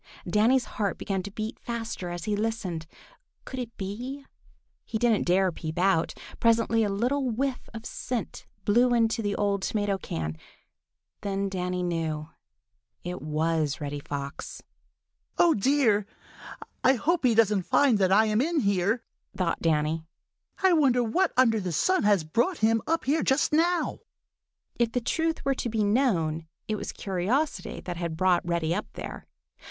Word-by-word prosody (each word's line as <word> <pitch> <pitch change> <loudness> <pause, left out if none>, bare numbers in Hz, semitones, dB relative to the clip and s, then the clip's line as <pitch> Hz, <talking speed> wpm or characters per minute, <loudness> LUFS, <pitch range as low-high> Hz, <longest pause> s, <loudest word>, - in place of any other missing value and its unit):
Danny's 225 +7 +3
heart 205 -3 -2
began 195 -2 -2
to 195 - -7
beat 215 +2 -5
faster 230 -6 -4
as 175 -1 -5
he 210 +2 0
listened. 205 -7 -3 0.6
Could 260 - -6
it 235 -2 -6
be? 245 +8 -5 0.6
He 220 - -3
didn't 230 -4 +2
dare 185 +1 +3
peep 160 -1 -6
out. 175 -3 +2 0.2
Presently 230 0 +3
a 210 - +1
little 250 +7 0
whiff 255 +3 -2
of 225 0 -8
scent 245 -3 -4 0.2
blew 240 +4 +4
into 225 0 +2
the 205 -2 -1
old 200 -1 0
tomato 205 -1 -1
can. 80 - -4 0.8
Then 195 0 -1
Danny 180 -1 -2
knew—it 155 -5 -6
was 155 -1 0
Reddy 145 -1 -4
Fox. 140 -1 -6 0.7
"Oh, 340 -2 +5
dear! 215 -3 +2 0.8
I 265 - +6
hope 320 +6 0
he 240 -3 +4
doesn't 210 -3 +4
find 255 -7 +4
that 190 -1 +3
I 215 +3 +6
am 215 +1 +2
in 320 +1 +1
here!" 200 +3 +1 0.3
thought 180 -3 0
Danny. 160 0 0 0.6
"I 380 -1 +6
wonder 265 -6 +4
what 345 +11 +1
under 230 -4 +4
the 185 -3 -3
sun 370 - +2
has 205 -5 +3
brought 240 - 0
him 225 +1 +3
up 330 +1 0
here 300 +4 +2
just 270 +3 +2
now." 345 +3 +2 0.8
If 235 -1 +1
the 250 - +2
truth 320 +7 -1
were 275 - +3
to 250 - -3
be 220 -1 0
known, 175 - +1 0.2
it 215 - -1
was - - -5
curiosity 210 - -2
that 175 -2 -5
had 170 -2 -3
brought 185 0 +3
Reddy 170 -1 +1
up 210 +4 -2
there. - - -7
210 Hz, 160 wpm, -27 LUFS, 175-245 Hz, 0.8 s, I